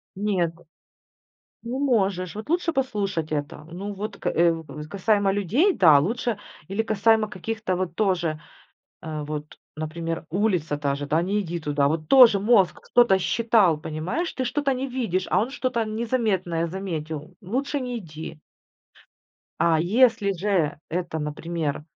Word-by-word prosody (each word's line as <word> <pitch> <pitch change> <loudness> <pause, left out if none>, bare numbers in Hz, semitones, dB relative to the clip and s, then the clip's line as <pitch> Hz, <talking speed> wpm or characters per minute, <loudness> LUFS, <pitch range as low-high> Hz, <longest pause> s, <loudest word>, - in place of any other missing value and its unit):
Нет, 190 -4 0 1.1
ну 240 +3 -4
можешь, 195 -9 +1
вот 215 +6 -7
лучше 340 0 +1
послушать 200 - -2
это. 150 0 -4
Ну 180 +6 -6
вот 205 +1 -5
к - - -10
э, 170 0 +3 0.3
касаемо 200 +1 +2
людей, 220 - +2
да, 155 -6 +7
лучше 225 - -1 0.3
или 200 +4 0
касаемо 220 0 +2
каких-то 215 0 -3
вот 180 -2 -3
тоже, 175 -7 0 0.6
э, 155 -2 -4
вот, 150 0 -6 0.2
например, 165 +2 -4
улица 175 -6 0
та 140 -1 0
же, 145 +1 -5
да: 155 +3 +2
"Не 200 +4 0
иди 175 -3 -4
туда". 145 -2 +1
Вот 155 +1 -2
тоже 250 -6 +8
мозг 200 -2 +3
что-то 240 -6 +5
считал, 215 -5 +3
понимаешь, 160 - -3
ты 260 - -3
что-то 275 +3 0
не 260 +2 -3
видишь, 225 -8 -2
а 185 - +3
он 230 +5 -1
что-то 255 -4 -1
незаметное 215 -7 -1
заметил- 160 -4 -5
лучше 265 +9 -2
не 245 -2 -3
иди. 160 -4 -9 1.2
А 165 -2 +3
если 220 +3 +3
же 180 -5 0
это, 170 -1 -3
например, 150 0 -3
190 Hz, 145 wpm, -24 LUFS, 160-225 Hz, 1.2 s, тоже